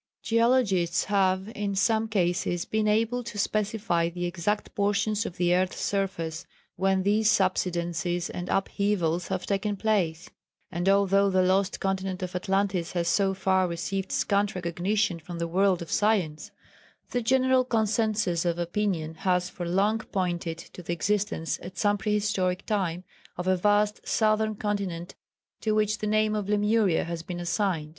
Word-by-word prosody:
Geologists 230 -7 +2
have 190 -1 +1
in 205 -3 -3
some 220 +2 +2
cases 175 -3 0
been 215 0 0
able 230 +3 +1
to 230 -3 -8
specify 205 -5 0
the 175 +1 -4
exact 175 +4 -2
portions 205 +2 0
of 175 - -9
the 175 0 +2
earth's 185 +1 0
surface 170 -5 -2 0.3
where 190 +1 +2
these 205 +3 +2
subsidences 175 -3 0
and 175 0 -6
upheavals 195 -4 0
have 180 - -3
taken 200 +1 -1
place, 185 -6 0 0.4
and 175 +3 0
although 200 0 +4
the 185 -1 +3
lost 190 +1 +1
continent 190 -1 -2
of 180 0 -5
Atlantis 190 -2 0
has 170 -1 -1
so 195 +1 +2
far 190 -1 +2
received 180 +3 -3
scant 200 -1 +1
recognition 180 +2 -1
from 170 +2 -8
the 170 0 -2
world 185 0 +2
of 165 - -11
science, 195 -8 +1 0.6
the 245 - 0
general 260 +2 +3
concensus 215 -6 +1
of 170 -1 0
opinion 175 -2 -1
has 180 +2 0
for 175 -2 -5
long 205 +5 +2
pointed 175 -5 -2
to 180 - -11
the 170 0 -3
existence, 200 -1 -1
at 180 +2 -9
some 205 -1 +2
prehistoric 205 -4 0
time, 185 -4 -1 0.3
of 180 +1 -4
a 185 - +4
vast 205 +2 +1
southern 215 0 +2
continent 195 -5 -3 0.5
to 215 -1 0
which 215 0 +1
the 215 - -2
name 215 0 +2
of 205 -2 -2
Lemuria 210 -3 +2
has 170 0 -4
been 175 +1 -6
assigned. 175 -2 -1
195 Hz, 155 wpm, -27 LUFS, 175-210 Hz, 0.6 s, although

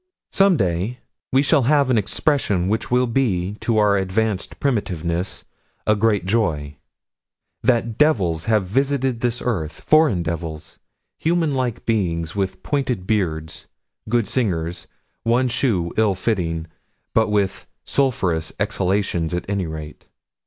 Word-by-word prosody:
Some 195 -3 +4
day 95 +5 -1 0.3
we 135 +2 +4
shall 145 0 +4
have 140 -3 +4
an 120 - +3
expression 105 - +1
which 110 +3 -1
will 125 +1 +3
be, 105 -7 0
to 115 -2 0
our 105 -1 +4
advanced 95 +1 -1
primitiveness, 90 - -1 0.4
a 105 - +4
great 105 -3 +1
joy: 80 -9 0 0.8
That 115 -2 +1
devils 95 - +2
have 110 -3 +2
visited 135 +3 0
this 120 0 -1
earth: 85 -11 -2
foreign 155 - +4
devils: 80 -2 -5 0.4
human 165 -2 +1
like 125 -3 -2
beings, 85 -7 -1
with 95 -2 -2
pointed 130 -9 -1
beards: 80 -7 -2 0.4
good 120 -2 +2
singers; 85 -9 -1 0.3
one 120 +3 +2
shoe 110 -9 0
ill 110 -3 +3
fitting 90 -5 -1 0.5
but 110 -1 +3
with 100 -2 0 0.2
sulphurous 90 - +1
exhalations, 95 -4 0
at 90 - -4
any 100 -3 -1
rate. 80 -1 -8
105 Hz, 130 wpm, -21 LUFS, 90-125 Hz, 0.8 s, Some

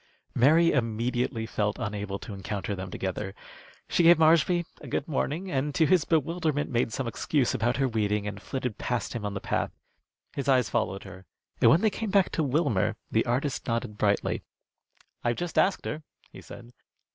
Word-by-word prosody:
Mary 160 +7 +5
immediately 120 0 -1
felt 105 -2 -1
unable 100 -1 -3
to 105 - -8
encounter 100 0 -4
them 95 0 -6
together. 95 +2 -4 0.5
She - - +2
gave 170 0 +7
Marshby 165 +2 +4 0.2
a - - -9
good - - -2
morning, 160 +5 -2
and, 140 +1 -1
to 160 - +4
his 180 -2 +3
bewilderment, 160 -2 0
made 120 -2 +1
some 130 - -3
excuse 125 +3 0
about 120 +2 0
her 135 -1 +2
weeding 105 -3 0
and 105 -1 -5
flitted 125 -5 -4
past 120 -3 -2
him 120 -3 -4
on 100 - -5
the - - -2
path. - - -1 0.6
His 140 0 -3
eyes 130 -3 +3
followed 95 +1 -1
her, 95 0 -12 0.3
and - - +7
when 165 - +5
they 220 -1 +3
came 225 +1 -3
back 195 -1 +3
to - - 0
Wilmer 135 - +1 0.2
the - - +2
artist 130 +3 -1
nodded 115 -3 -2
brightly. 100 -1 +1 0.8
"I've 120 0 +1
just 175 +4 -4
asked 195 - +2
her," 155 - -3 0.3
he - - -11
said. 120 0 -12
125 Hz, 180 wpm, -27 LUFS, 105-155 Hz, 0.8 s, gave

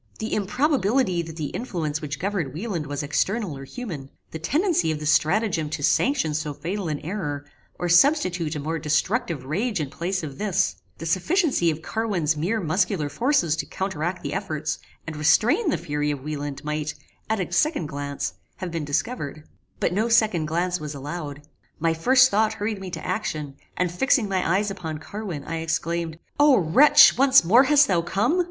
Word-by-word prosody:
The 220 - -4
improbability 215 - +1
that 165 -1 -8
the 150 -4 -4
influence 160 - -3
which 150 -2 -4
governed 180 -6 -2
Wieland 175 -5 -3
was 145 +1 -3
external 185 +4 -1
or 135 0 -8
human; 160 - -7 0.2
the 160 - -6
tendency 295 - +1
of 155 - -3
this 150 0 +1
stratagem 170 -3 +1
to 145 -1 -4
sanction 245 - +2
so 150 -1 -3
fatal 185 +4 -4
an 150 -2 -2
error, 150 -6 -4 0.3
or 175 - -2
substitute 175 - +3
a - - -3
more 160 +3 -3
destructive 160 - 0
rage 200 - -1
in 145 -3 -3
place 180 +1 -2
of 140 -3 -7
this; 205 -4 0 0.2
the 165 - -7
sufficiency 190 - +2
of 160 0 -3
Carwin's 195 -9 0
mere 185 +9 -1
muscular 180 -3 0
forces 245 - +1
to - - -3
counteract 180 -2 -3
the - - -3
efforts, 155 -5 -3 0.3
and 155 - -6
restrain 215 - +3
the - - +1
fury 150 -3 -2
of 145 -3 -3
Wieland, 145 -1 -5
might, 150 0 -3 0.3
at 220 -1 0
a 180 -2 -3
second 300 - +1
glance, 140 -1 -4 0.2
have 185 -2 -6
been 165 -2 -3
discovered; 150 - -3 0.4
but - - 0
no 220 +5 +1
second 215 -9 +3
glance 175 +3 -1
was 150 -1 -6
allowed. 145 0 -6 0.3
My 165 +1 +1
first 260 +10 +5
thought 215 +1 +2
hurried 210 -1 -3
me 190 - -6
to 180 - -7
action, 155 -10 -3 0.2
and, 180 -1 0
fixing 245 +4 +2
my 185 -3 0
eyes 205 +1 0
upon 160 -5 -5
Carwin 175 -2 -6
I 165 +3 -4
exclaimed 165 0 -2 0.2
"O 290 -3 +6
wretch! 275 - +6
once 270 -3 +6
more 235 +11 +6
hast 290 0 +5
thou 175 -6 +2
come? 205 - +1
175 Hz, 180 wpm, -24 LUFS, 155-215 Hz, 0.4 s, O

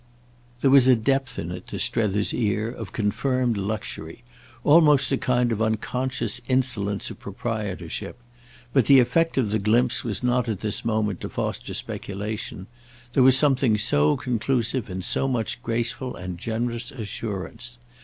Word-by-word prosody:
There 135 - +4
was 135 -2 +7
a 130 - +7
depth 130 +1 0
in 85 - -4
it, 90 - -7
to - - -5
Strether's 105 -2 +1
ear, 110 0 0
of 110 -6 -8
confirmed 120 +3 0
luxury—almost 120 - +1
a 135 - +2
kind 125 -1 +1
of 110 -1 -1
unconscious 120 +1 -1
insolence 120 -6 0
of - - -10
proprietorship; 100 -2 -5 0.6
but 135 -5 +3
the 140 - +8
effect 140 +7 +2
of 115 -6 +1
the 110 - +1
glimpse 120 +5 +2
was 115 0 -2
not 125 -1 +1
at 105 -4 -3
this 105 -2 -2
moment 110 -4 -1
to - - -4
foster - - -4
speculation: 100 -1 -5 0.5
there 135 - +4
was 130 0 +7
something 130 -6 +3
so 75 -8 +3
conclusive 120 -1 -1
in 95 0 -4
so 135 - +1
much 120 -2 -2
graceful 120 +2 -2
and 90 -1 -6
generous 120 +2 -3
assurance. 115 -1 -6
115 Hz, 150 wpm, -24 LUFS, 105-125 Hz, 0.6 s, the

